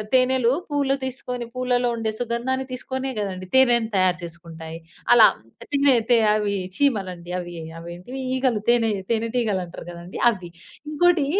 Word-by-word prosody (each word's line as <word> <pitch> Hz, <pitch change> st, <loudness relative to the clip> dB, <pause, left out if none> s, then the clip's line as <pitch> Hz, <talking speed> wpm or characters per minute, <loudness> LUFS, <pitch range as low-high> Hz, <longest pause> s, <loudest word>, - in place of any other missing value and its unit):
తేనెలు 255 Hz, -1 st, +3 dB, 0.2 s
పూలు 280 Hz, -2 st, +1 dB
తీసుకొని 250 Hz, -2 st, -5 dB
పూలలో 250 Hz, -1 st, +1 dB
ఉండే 220 Hz, -1 st, -2 dB
సుగంధాన్ని 245 Hz, +3 st, -1 dB
తీసుకొనే 260 Hz, +1 st, -4 dB
గదండీ! 185 Hz, -2 st, -4 dB
తేనెను 240 Hz, -4 st, +5 dB
తయారు 185 Hz, -1 st, +3 dB
చేసుకుంటాయి. 165 Hz, -1 st, -9 dB, 0.3 s
అలా 235 Hz, -2 st, +9 dB, 0.5 s
తినే 280 Hz, -1 st, +4 dB, 0.2 s
తే 240 Hz, -, +6 dB, 0.2 s
అవి 210 Hz, -1 st, +1 dB, 0.2 s
చీమలండి. 190 Hz, -10 st, -1 dB
అవీ 175 Hz, -1 st, -7 dB, 0.3 s
అవేంటివి? 175 Hz, +10 st, -8 dB, 0.2 s
ఈగలు 255 Hz, -4 st, +1 dB
తేనె 235 Hz, -2 st, +4 dB, 0.2 s
తేనె 230 Hz, 0 st, +1 dB
టీగలంటరు 195 Hz, -8 st, -1 dB
గదండి! 175 Hz, +1 st, -9 dB
అవ్వి. 185 Hz, -6 st, -5 dB, 0.4 s
ఇంకోటి 330 Hz, 0 st, +3 dB
235 Hz, 130 wpm, -23 LUFS, 185-260 Hz, 0.5 s, అలా